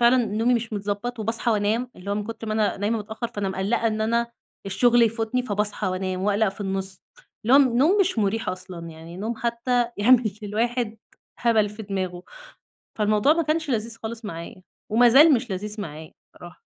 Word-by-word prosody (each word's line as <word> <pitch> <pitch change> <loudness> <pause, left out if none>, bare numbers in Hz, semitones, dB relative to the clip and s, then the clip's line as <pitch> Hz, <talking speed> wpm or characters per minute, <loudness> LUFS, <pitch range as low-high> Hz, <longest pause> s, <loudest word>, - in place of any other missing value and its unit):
فعلًا 240 +2 +6
نومي 225 +4 +1
مش 230 -1 -2
متضبط 205 +4 -3
وباصحي 225 +2 -1
وأنام، 220 +3 0
اللي 195 +2 -7
هو - - +1
من 210 0 -2
كتر 225 0 -7
ما 215 - -2
أنا 215 -1 +1
نايمة 210 +3 0
متأخر 220 +3 -5
فأنا 200 -1 -3
مقلقة 195 +5 0
إن 215 -1 -1
أنا 235 +2 +1 0.4
الشغل 240 +5 +4
يفوتني، 230 +2 0
فباصحى 210 -2 -1
وأنام 185 0 -2
وأقلق 205 +1 +2
في 195 +2 -9
النص. 190 -1 -3 0.4
اللي 240 +4 +4
هو - - +9
نوم 280 - +4
مش 380 -10 +1
مُريح 215 +2 0
أصلًا، 180 -2 -6
يعني 165 +2 -11
نوم 220 +4 -3
حتى 240 +1 0
يعمل 230 +1 +4
للواحد 225 +2 -1 0.4
هبل 225 -3 +3
في 210 +2 -9
دماغه. 185 -3 -4 0.8
فالموضوع 210 +6 +3
ما 335 +1 +1
كانش 310 -1 -1
لذيذ 230 -1 -2
خالص 225 0 -6
معايا، 170 0 -7 0.3
ومازال 245 +7 +7
مش 245 -1 -2
لذيذ 210 +3 -4
معايا 155 -3 -8 0.2
الصراحة. 175 0 -13
220 Hz, 180 wpm, -24 LUFS, 200-235 Hz, 0.8 s, هو